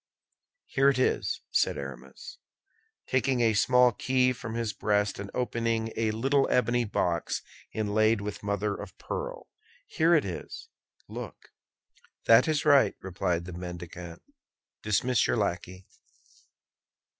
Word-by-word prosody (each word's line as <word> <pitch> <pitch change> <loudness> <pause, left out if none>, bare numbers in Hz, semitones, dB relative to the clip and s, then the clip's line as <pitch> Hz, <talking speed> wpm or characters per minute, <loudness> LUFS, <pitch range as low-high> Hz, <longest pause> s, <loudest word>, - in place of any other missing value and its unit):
"Here 135 0 +3
it 135 - +1
is," 130 - 0
said - - +2
Aramis, 70 -2 -9 0.7
taking 130 -1 +1
a 115 -2 +3
small 125 +3 +4
key 125 +2 +1
from 115 -2 -7
his 115 -3 -2
breast 105 -2 0
and 100 0 -6
opening 115 -2 -1
a 115 -1 0
little 135 +6 +1
ebony 120 0 +2
box 85 -5 -1 0.3
inlaid 110 +1 +2
with 100 0 -6
mother 100 0 -1
of - - -9
pearl, - - -5 0.4
"here 170 - +3
it 150 - +2
is. 90 -3 -7 0.4
Look." - - -9 0.7
"That 115 +5 +6
is 155 -1 0
right," 140 -8 +5
replied 90 -2 -2
the 90 - -8
mendicant; 90 -1 -8 0.6
"dismiss 115 +4 +1
your - - +1
lackey." 95 -2 -3
110 Hz, 125 wpm, -28 LUFS, 100-125 Hz, 0.7 s, That